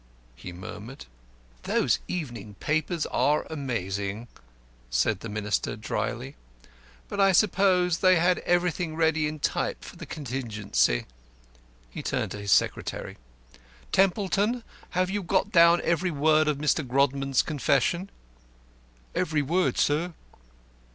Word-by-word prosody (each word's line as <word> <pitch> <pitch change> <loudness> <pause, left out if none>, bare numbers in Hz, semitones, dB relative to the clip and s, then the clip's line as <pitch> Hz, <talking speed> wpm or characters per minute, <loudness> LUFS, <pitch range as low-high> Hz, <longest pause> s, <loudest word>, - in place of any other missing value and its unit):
he 90 - -9
murmured. 105 +8 -9 0.6
"Those - - +1
evening 120 - -5
papers 160 - -1
are 150 +1 +1
amazing," 110 - -3 0.6
said 60 - +1
the 115 - -7
Minister, 105 -1 -2
drily. - - -4 0.7
"But - - -5
I 195 -1 +5
suppose 180 -3 +3
they 185 -1 +5
had 175 +2 +3
everything 175 -2 0
ready 160 -1 +2
in 155 +1 -5
type 145 - -2
for - - -11
the - - -9
contingency." 105 - -1 0.9
He - - -6
turned - - -2
to 105 - -6
his 100 -1 -2
secretary. - - 0 0.7
"Templeton, 200 +4 +2 0.3
have 185 0 +2
you 205 +1 -1
got 190 +3 0
down 170 -1 +6
every 170 +2 +1
word 155 0 +3
of 150 -2 +1
Mr. 150 +1 +1
Grodman's 135 +1 +1
confession?" 155 +5 0 1.0
"Every 150 -1 0
word, 175 +6 +1
sir." 160 +4 +1
155 Hz, 120 wpm, -27 LUFS, 120-180 Hz, 1.0 s, down